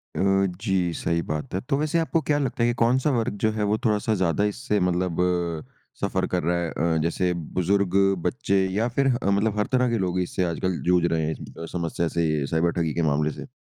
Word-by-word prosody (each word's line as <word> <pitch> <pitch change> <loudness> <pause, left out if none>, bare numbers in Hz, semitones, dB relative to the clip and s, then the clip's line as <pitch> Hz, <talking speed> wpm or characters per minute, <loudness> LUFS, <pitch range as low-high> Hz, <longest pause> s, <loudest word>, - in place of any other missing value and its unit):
अ, - - -3 0.4
जी। 95 -5 0
सही 85 0 -1
बात 75 +1 -4
है। 95 - +1
तो 140 - +2
वैसे 155 +3 +1
आपको 165 0 +1
क्या 145 - +4
लगता 125 -3 -1
है 120 - +3
कि 120 - +1
कौन-सा 130 +5 +3
वर्ग 110 -2 -1
जो 110 - +3
है 105 -1 -2
वो 110 - +2
थोड़ा-सा 110 +1 +1
ज्यादा 90 +3 +2
इससे 120 -5 -1
मतलब 90 -1 0 0.8
सफ़र - - 0
कर 90 -2 +1
रहा 85 +1 +1
है 85 - -2
अ, 80 +1 0
जैसे 90 +2 0
बुज़ुर्ग, 90 +3 0 0.3
बच्चे 100 -8 +1
या 105 +5 0
फ़िर 140 -1 +3
ह 120 -6 +1
मतलब 105 +1 +1
हर 105 - +2
तरह 125 -1 +3
के 115 - 0
लोग 90 -2 -1
इससे 90 +1 -1
आजकल 85 +1 -2
जूझ 90 -1 +4
रहे 80 -2 +1
हैं 80 - -1
इस - - -6 0.2
अ, 80 - -5
समस्या 85 0 -1
से 75 -4 +1
साइबर 85 +2 +1
ठगी 80 -3 -1
के 85 - -1
मामले 75 +1 +1
से? - - -9
95 Hz, 225 wpm, -25 LUFS, 85-110 Hz, 0.8 s, क्या